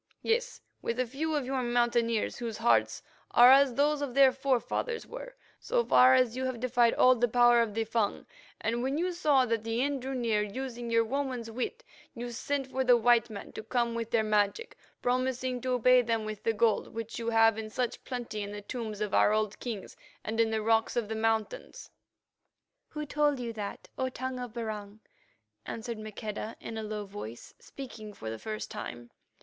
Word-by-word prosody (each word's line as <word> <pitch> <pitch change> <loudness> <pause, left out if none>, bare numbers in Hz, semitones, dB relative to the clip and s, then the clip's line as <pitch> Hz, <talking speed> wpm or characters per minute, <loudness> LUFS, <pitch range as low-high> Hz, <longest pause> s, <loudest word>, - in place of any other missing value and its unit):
Yes, 485 +2 0 0.2
with 230 +2 -2
a 255 - +2
few 305 +6 -2
of 290 -3 -1
your 265 0 -1
Mountaineers 240 -2 +1
whose 230 -3 -4
hearts 230 +1 +2 0.3
are 245 +1 +8
as 270 -2 +5
those 290 +1 +2
of 270 -3 -4
their 275 -1 +7
forefathers 270 - -1
were, - - -9 0.2
so 480 0 0
far 255 +1 +6
as 255 -2 +2
you 260 0 -2
have 255 -2 -3
defied 240 -1 +3
all 255 - +6
the 245 0 +1
power 240 0 +5
of 215 -3 -2
the 225 - +1
Fung, 225 -2 -1 0.3
and 235 +2 -1
when 265 +3 -1
you 360 +3 0
saw 295 -6 +3
that 230 -2 -1
the 225 +1 -2
end 280 -2 -1
drew 265 +1 -4
near, 230 -4 +1
using 240 +3 -5
your 230 0 +3
woman's 255 -2 -3
wit, 255 - -4 0.3
you 240 0 -5
sent 275 +3 -2
for 265 0 -2
the 245 -1 +6
white 240 0 +4
men 205 -2 -8
to - - -7
come 235 +1 -1
with 230 -1 -3
their 230 -2 +2
magic, 210 - 0 0.3
promising 255 0 0
to 255 0 0
pay 250 +2 +6
them 225 -2 -1
with 215 -1 -6
the 225 - +1
gold 225 0 +2
which 230 +1 -5
you 230 0 -2
have 225 -1 +4
in 215 -1 -5
such 245 +2 -3
plenty 240 -4 -5
in 200 0 -5
the 205 0 -7
tombs 215 -2 -5
of 210 -2 -2
our - - +5
old 215 -1 0
kings 225 -6 -6 0.3
and 220 +1 -3
in 225 -1 +4
the 220 -1 -1
rocks 225 0 +2
of 230 -3 -1
the 220 - -2
mountains." 220 -1 -2 1.0
"Who 300 -1 -5
told 295 -1 +1
you 235 -2 -4
that, 205 -2 -6
O 260 0 0
Tongue 255 0 -5
of 245 -3 -6
Barung?" 215 -3 -6 0.7
asked 230 +1 -5
Maqueda 215 0 -6
in 225 - -7
a - - -3
low 210 -1 -4
voice, 195 - -9
speaking 225 -6 -9
for 110 - -6
the 110 - -6
first 215 - -5
time. 120 0 -7
235 Hz, 200 wpm, -30 LUFS, 220-260 Hz, 1.0 s, are